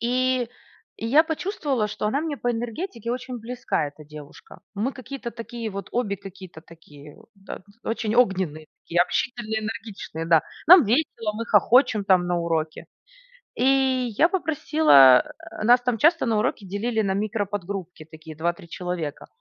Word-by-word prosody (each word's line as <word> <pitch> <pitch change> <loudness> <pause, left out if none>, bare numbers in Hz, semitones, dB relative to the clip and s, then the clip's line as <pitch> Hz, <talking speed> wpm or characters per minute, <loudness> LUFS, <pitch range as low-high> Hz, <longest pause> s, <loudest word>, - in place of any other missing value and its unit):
И 250 +1 0 0.5
я 255 +8 +4
почувствовала, 300 - -2
что 210 - -3
она 275 +7 0
мне 310 -2 -3
по 245 - -1
энергетике 235 - -4
очень 250 0 -5
близка, 240 -8 -2
эта 150 +1 -15
девушка. 150 -1 -13
Мы 230 +7 -2
какие-то 255 -1 -7
такие 230 -1 -6
вот, 200 0 -7
обе 215 -5 -1
какие-то 185 -4 -12
такие 150 -3 -15
вот, - - -20
да, 195 -1 -10 0.2
очень 225 -1 -2
огненные, 185 -10 +1 0.2
такие 175 +1 +1
общительные, 220 +2 -2
энергичные, 215 -7 -6
да. 165 -2 +4 0.2
Нам 345 -4 +9
весело, 230 -2 0
мы 230 +1 -5
хохочем 220 0 +4
там 185 -2 +3
на 175 0 0
уроке. 160 -2 -2 0.7
И 265 -1 +2
я 330 - +6
попросила 300 - +5 0.3
нас 245 +2 +5
там 245 -2 -1
часто 325 +7 +3
на 225 -3 +1
уроке 215 -2 -2
делили 220 +4 -1
на 195 -2 0
микро-подгруппки, 200 -5 -4
такие 160 0 -11
2-3 170 +3 -3
человека. 180 -5 -5
220 Hz, 150 wpm, -24 LUFS, 180-250 Hz, 0.7 s, Нам